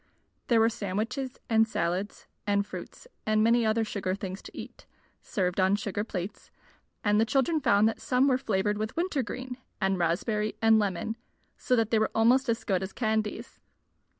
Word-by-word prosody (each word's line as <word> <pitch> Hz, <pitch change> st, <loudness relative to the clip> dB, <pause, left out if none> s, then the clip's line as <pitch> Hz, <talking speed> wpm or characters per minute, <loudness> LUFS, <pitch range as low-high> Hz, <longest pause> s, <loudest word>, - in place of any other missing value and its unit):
There 235 Hz, -2 st, +4 dB
were 225 Hz, -, +5 dB
sandwiches 230 Hz, +5 st, -3 dB
and 225 Hz, -1 st, +4 dB
salads 180 Hz, 0 st, -2 dB, 0.2 s
and 200 Hz, 0 st, +2 dB
fruits 205 Hz, -, -9 dB, 0.2 s
and 215 Hz, 0 st, +3 dB
many 230 Hz, 0 st, +4 dB
other 220 Hz, +1 st, +2 dB
sugar 190 Hz, -3 st, -2 dB
things 195 Hz, -1 st, -6 dB
to -, -, -12 dB
eat, -, -, -9 dB, 0.3 s
served 180 Hz, -2 st, -1 dB
on 190 Hz, +1 st, +4 dB
sugar 205 Hz, 0 st, -2 dB
plates; 200 Hz, -1 st, -6 dB, 0.5 s
and 210 Hz, +1 st, +3 dB
the -, -, +5 dB
children 275 Hz, +7 st, +1 dB
found 205 Hz, -4 st, +4 dB
that 225 Hz, -, -2 dB
some 255 Hz, +2 st, +2 dB
were 260 Hz, -2 st, +3 dB
flavored 210 Hz, -3 st, 0 dB
with 215 Hz, +6 st, -4 dB
winter 340 Hz, -5 st, 0 dB
green 255 Hz, +1 st, -6 dB, 0.2 s
and 190 Hz, -1 st, +1 dB
raspberry 210 Hz, +6 st, 0 dB
and 225 Hz, -1 st, +5 dB
lemon, 205 Hz, +2 st, -2 dB, 0.4 s
so 255 Hz, -, +1 dB
that 225 Hz, -2 st, +1 dB
they 225 Hz, -, +4 dB
were 220 Hz, -, +2 dB
almost 245 Hz, +4 st, +4 dB
as 230 Hz, 0 st, 0 dB
good 190 Hz, -4 st, 0 dB
as 190 Hz, 0 st, -5 dB
candies. 220 Hz, -2 st, -2 dB
215 Hz, 180 wpm, -28 LUFS, 200-230 Hz, 0.5 s, were